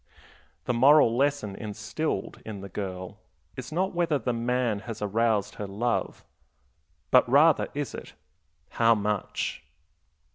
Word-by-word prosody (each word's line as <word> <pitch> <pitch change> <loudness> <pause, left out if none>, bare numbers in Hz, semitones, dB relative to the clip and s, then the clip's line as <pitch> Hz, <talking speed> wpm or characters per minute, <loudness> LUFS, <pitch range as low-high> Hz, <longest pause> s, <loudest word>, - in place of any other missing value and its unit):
The - - 0
moral 130 -1 +5
lesson 135 -6 0
instilled 110 +3 -4
in 105 -3 -7
the 100 - -8
girl 95 +1 -6 0.4
is 125 +1 -7
not 185 +5 -1
whether 170 -3 +1
the 125 -1 -2
man 120 -2 0
has 115 +1 -7
aroused 105 0 0
her 105 - -3
love, 115 +5 -2 0.9
but 125 -1 +5
rather 150 +4 +5
is 145 -1 -3
it, - - -9 0.6
"How 115 0 +3
much?" 105 -1 -2
115 Hz, 130 wpm, -27 LUFS, 105-135 Hz, 0.9 s, moral